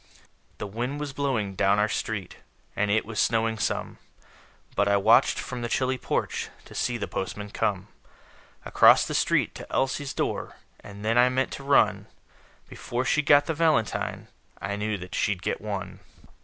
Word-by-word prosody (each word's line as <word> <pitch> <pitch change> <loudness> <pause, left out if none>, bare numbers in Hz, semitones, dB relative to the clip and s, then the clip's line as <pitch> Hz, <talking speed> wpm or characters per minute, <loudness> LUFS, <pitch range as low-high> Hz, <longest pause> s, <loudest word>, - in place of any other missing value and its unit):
The - - -5
wind 120 +8 -4
was 145 -2 -4
blowing 125 -9 -1
down 100 +2 +2
our 105 +1 +3
street, 105 -4 -4 0.4
And 105 0 0
it 110 +2 +2
was 110 0 -5
snowing 115 -1 +1
some; - - -2 0.8
But 100 - +2
I 100 0 +4
watched 100 - +4
from 120 - -5
the 120 - -3
chilly 130 +1 0
porch - - -2 0.2
To - - -13
see 120 - -1
the - - -4
postman 105 +2 -5
come. 100 -4 -1 0.8
Across - - +6
the - - -4
street - - +1
to - - -10
Elsie's 135 +1 -1
door; - - -2 0.2
And 100 +1 -10
then 115 +2 +3
I 125 +1 +6
meant 130 +1 0
to 140 - -7
run 140 0 +3 0.6
Before 125 +2 -4
she 150 - +2
got 145 0 +5
the 160 - -1
valentine 155 -10 0 0.3
I 100 - -3
knew 105 0 -2
that 90 -1 -10
she'd 95 -3 -1
get - - -2
one. 100 -3 -5
110 Hz, 170 wpm, -26 LUFS, 100-130 Hz, 0.8 s, Across